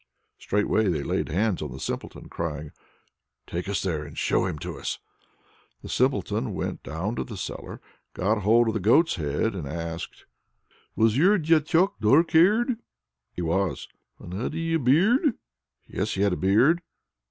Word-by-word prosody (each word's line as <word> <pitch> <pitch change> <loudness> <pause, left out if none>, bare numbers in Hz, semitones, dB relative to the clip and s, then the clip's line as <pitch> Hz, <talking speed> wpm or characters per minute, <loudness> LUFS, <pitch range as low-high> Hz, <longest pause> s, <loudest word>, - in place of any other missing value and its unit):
Straightway 105 +1 +1
they 80 -6 0
laid - - -1
hands 95 +3 0
on 75 -4 -5
the 65 - -8
Simpleton, - - -5
crying, 75 -3 -5 0.7
"Take 90 +3 -4
us 100 - -1
there 85 -5 -1
and 75 0 -11
show - - +1
him 85 -5 -4
to - - -6
us." - - -3 0.9
The - - -8
Simpleton 65 - 0
went - - -4
down 80 +7 -4
into 115 - -2
the 110 -4 -8
cellar, - - -6 0.4
got 105 +3 0
hold 115 +3 +4
of - - -1
the 110 - -1
goat's 135 - +3
head, 75 +8 -1
and 85 -7 -5
asked: 85 +2 -6 0.7
"Was 110 +1 +3
your 195 +6 +5
Diachok 165 +3 +2
dark 140 +11 +4
haired?" 215 +9 +4 0.5
"He 90 - -5
was." 95 +3 -1 0.3
"And 90 - -10
had 120 +10 -3
he 165 0 -2
a 165 - +2
beard?" 210 - +3 0.5
"Yes, 105 +2 -3
he'd 100 0 +2
a - - 0
beard." 120 - +3
105 Hz, 165 wpm, -26 LUFS, -, 0.9 s, your